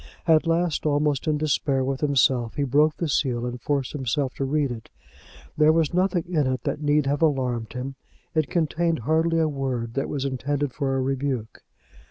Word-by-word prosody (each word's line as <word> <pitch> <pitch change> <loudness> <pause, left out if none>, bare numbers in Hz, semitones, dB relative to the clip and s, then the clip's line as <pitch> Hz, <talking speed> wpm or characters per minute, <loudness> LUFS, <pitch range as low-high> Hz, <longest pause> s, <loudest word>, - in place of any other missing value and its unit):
At 165 -1 +4
last, 165 -1 +1
almost 145 -1 +1
in 155 -1 +2
despair 135 -2 0
with 135 0 -2
himself, 130 -5 +2
he 145 - 0
broke 150 +3 +3
the 170 - -1
seal 125 -5 0
and 125 0 -5
forced 140 -1 -1
himself 135 -1 -1
to 135 - -3
read 140 -1 0
it. 115 -2 -8 0.7
There 155 0 +5
was 160 0 +1
nothing 180 -1 +1
in 155 -6 +1
it 130 - -3
that 150 - -2
need 145 -1 +2
have 145 +2 0
alarmed 125 -7 0
him. 130 +2 -4 0.4
It 155 -3 +1
contained 165 0 0
hardly 160 +5 +1
a 160 -1 +3
word 130 -5 -3
that 135 +2 -2
was 140 -2 -2
intended 140 +1 -2
for 135 -2 -1
a - - 0
rebuke. 130 -4 -3
145 Hz, 190 wpm, -24 LUFS, 130-155 Hz, 0.7 s, There